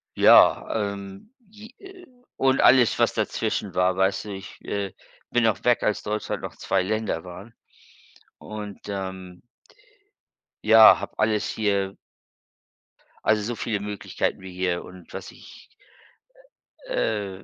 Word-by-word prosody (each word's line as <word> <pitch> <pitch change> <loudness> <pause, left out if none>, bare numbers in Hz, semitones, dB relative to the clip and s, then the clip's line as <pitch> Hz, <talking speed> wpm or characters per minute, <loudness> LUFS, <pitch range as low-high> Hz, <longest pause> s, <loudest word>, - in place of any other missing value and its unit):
ja, - - +6 0.3
ähm, 100 - -11 0.5
äh, 385 -2 -13
j - - -28 0.3
und 135 0 +2
alles, 125 -2 +5
was - - +3
dazwischen - - -2
war, 90 0 +2
weißte, 95 +2 0
ich, 95 -1 -9
äh, 100 -1 -3 0.4
bin 120 -1 +2
auch 110 - -1
weg, 120 -1 +2
als 105 - 0
Deutschland 105 +1 -3
noch - - -7
2 - - 0
Länder 105 -4 -2
waren. 95 +6 -11 0.8
Und, 105 -2 -8
ähm 95 -2 -6 1.2
ja, 110 0 +8
habe - - -7
alles 105 -1 +1
hier 100 -3 -1 1.3
also, 110 -1 +2
so 120 +2 -3
viele 110 -2 -2
Möglichkeiten 105 -2 -3
wie 95 -1 -9
hier 90 -1 -2
und 90 -1 -14
was - - -7
ich - - -16 1.2
äh, 100 - -2
100 Hz, 125 wpm, -24 LUFS, 95-110 Hz, 1.3 s, ja